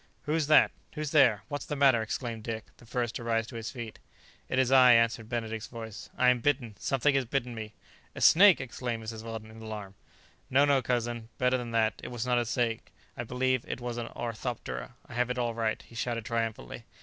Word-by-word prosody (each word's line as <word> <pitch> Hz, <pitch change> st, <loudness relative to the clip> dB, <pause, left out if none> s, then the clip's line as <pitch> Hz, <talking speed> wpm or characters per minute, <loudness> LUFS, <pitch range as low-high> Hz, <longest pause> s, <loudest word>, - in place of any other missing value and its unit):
"Who's 155 Hz, 0 st, 0 dB
that? 155 Hz, -, +6 dB, 0.2 s
who's 150 Hz, -2 st, -4 dB
there? 115 Hz, -9 st, +5 dB
what's 145 Hz, -1 st, -5 dB
the 150 Hz, -, -2 dB
matter?" 135 Hz, -5 st, +5 dB
exclaimed 115 Hz, +1 st, -4 dB
Dick, 110 Hz, -1 st, -4 dB
the 120 Hz, -, -18 dB
first 120 Hz, -1 st, -2 dB
to -, -, -5 dB
rise 115 Hz, -1 st, 0 dB
to 115 Hz, -, -11 dB
his 115 Hz, -1 st, -4 dB
feet. 115 Hz, -4 st, -8 dB, 0.5 s
"It -, -, -1 dB
is 130 Hz, -1 st, +3 dB
I," 130 Hz, -2 st, +8 dB
answered 115 Hz, -1 st, +2 dB
Benedict's 110 Hz, -2 st, -3 dB
voice; 110 Hz, -2 st, -8 dB
"I 125 Hz, -, +5 dB
am 125 Hz, -1 st, +3 dB
bitten. 125 Hz, -3 st, 0 dB
Something 135 Hz, +2 st, +1 dB
has 135 Hz, -2 st, +1 dB
bitten 125 Hz, 0 st, -2 dB
me." 110 Hz, -1 st, -7 dB, 0.4 s
"A -, -, -7 dB
snake!" 190 Hz, 0 st, +7 dB
exclaimed 120 Hz, -3 st, -4 dB
Mrs. 110 Hz, 0 st, -6 dB
Weldon 110 Hz, -1 st, -7 dB
in 110 Hz, 0 st, -12 dB
alarm. 105 Hz, -3 st, -7 dB, 0.6 s
"No, 140 Hz, +3 st, +5 dB
no, 140 Hz, -2 st, +3 dB
cousin, 120 Hz, -1 st, -2 dB
better 125 Hz, 0 st, +2 dB
than 120 Hz, -1 st, -5 dB
that! 110 Hz, -1 st, +1 dB
it -, -, -5 dB
was 120 Hz, -1 st, -4 dB
not 125 Hz, -1 st, +2 dB
a 120 Hz, -, 0 dB
snake; 115 Hz, 0 st, -1 dB, 0.2 s
I 120 Hz, -, -4 dB
believe 130 Hz, +1 st, 0 dB
it -, -, -4 dB
was 120 Hz, -1 st, -4 dB
an 120 Hz, -1 st, -3 dB
orthoptera; 115 Hz, -, -5 dB
I -, -, -12 dB
have 125 Hz, +1 st, 0 dB
it 125 Hz, -, -2 dB
all 120 Hz, -1 st, 0 dB
right," 110 Hz, -1 st, -1 dB
he -, -, -18 dB
shouted 115 Hz, -1 st, -3 dB
triumphantly. 115 Hz, -, -3 dB
120 Hz, 215 wpm, -29 LUFS, 115-125 Hz, 0.6 s, I